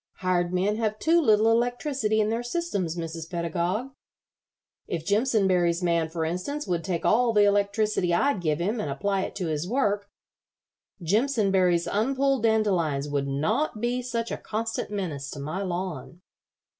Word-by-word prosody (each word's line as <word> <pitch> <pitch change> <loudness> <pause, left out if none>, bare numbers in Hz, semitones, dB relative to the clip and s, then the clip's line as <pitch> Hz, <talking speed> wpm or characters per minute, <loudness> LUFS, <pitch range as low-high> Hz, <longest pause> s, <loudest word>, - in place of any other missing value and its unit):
Hired 180 -1 0
men 195 +4 +1
have 215 -2 -1
too 335 +7 +3
little 220 -4 +4
electricity 240 -1 0
in 215 0 +2
their 230 +1 -1
systems, 240 - -2
Mrs. 165 -1 -5
Pedagog. 175 +8 -2 1.0
If 165 -2 -4
Jimpsonberry's 190 -6 +2
man, 170 -2 +1
for 160 0 -2
instance, 185 - -3
would 170 -2 -1
take 180 -4 -2
all 235 +1 +4
the 210 -1 +5
electricity 205 -2 +1
I'd 210 +3 +2
give 155 -3 0
him 205 +8 -1
and 155 - -2
apply 195 +8 -1
it - - -5
to 185 - -3
his 155 +1 -2
work, 205 -5 0 0.9
Jimpsonberry's 195 - +2
unpulled 270 +4 +1
dandelions 185 -11 +1
would 140 -1 -1
not 160 - 0
be 240 +2 -1
such 235 -2 -3
a - - -2
constant 225 +1 -3
menace 170 -10 -4
to 145 - -7
my 155 +7 -4
lawn. 175 -4 -4
200 Hz, 155 wpm, -26 LUFS, 170-225 Hz, 1.0 s, the